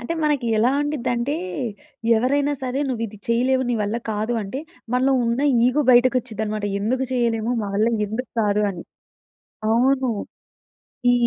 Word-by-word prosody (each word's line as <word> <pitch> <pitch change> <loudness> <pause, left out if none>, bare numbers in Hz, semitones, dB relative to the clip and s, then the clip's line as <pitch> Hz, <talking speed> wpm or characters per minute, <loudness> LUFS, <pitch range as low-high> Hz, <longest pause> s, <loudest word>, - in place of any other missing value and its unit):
అంటే 240 +8 -4
మనకి 295 -5 +1
ఎలా 235 +4 +4
ఉండిద్దంటే, 275 -2 -1 0.8
ఎవరైనా 280 +5 +1
సరే 260 +2 -1
నువ్విది 225 -4 -4
చేయలేవు, 255 +3 +2
నీ 240 - +1
వల్ల 210 +2 -1
కాదు 215 +2 -1
అంటే, 230 +8 -5 0.3
మనలో 260 +2 +3
ఉన్న 235 +2 0 0.2
ఈగో 255 +4 +3
బయటకొచ్చిద్దనమాట. 235 -4 +2
ఎందుకు 250 +6 0
చేయలేము, 235 -2 0
మా 205 - -3
వల్ల 215 +3 +3 0.2
ఎందుకు 225 +4 -5
కాదు 210 -1 +2
అని. 175 -3 -7 0.9
అవును. 260 +2 +3 1.0
ఈ - - +4
240 Hz, 135 wpm, -22 LUFS, 220-260 Hz, 1.0 s, ఎలా